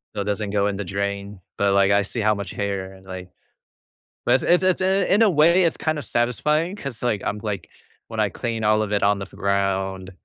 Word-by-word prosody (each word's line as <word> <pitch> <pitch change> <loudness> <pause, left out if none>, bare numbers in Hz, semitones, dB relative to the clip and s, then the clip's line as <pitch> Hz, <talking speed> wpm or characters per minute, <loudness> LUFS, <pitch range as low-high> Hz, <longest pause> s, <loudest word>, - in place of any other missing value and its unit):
So 105 - -1
it - - -1
doesn't 105 0 -2
go 100 0 +1
in 100 -1 -1
the 105 - -3
drain, 100 +1 -4 0.2
but, 100 -1 +2
like, 100 0 +4
I 100 - +4
see 105 +4 -3
how 110 0 +3
much 100 -3 -5
hair 100 -2 -3
and, 95 0 -17
like 95 -1 -8 1.0
But - - +4
it's - - +1
it's 175 +2 +3
it's 185 0 +2
in 195 +2 +2
a 220 - +6
way 170 +3 +4
it's 165 - +1
kind 155 -1 -1
of 140 - -5
satisfying 150 - 0
'cause, 140 - -6
like, 110 -5 0
I'm 105 - -2
like, 100 -6 -4 0.4
when - - -6
I - - +2
clean 115 -2 -4
all 110 0 +3
of 105 -1 -3
it 100 - +1
on 100 0 +3
the 100 - -4
f - - -20
ground, 95 -1 -1
105 Hz, 240 wpm, -23 LUFS, 100-135 Hz, 1.0 s, a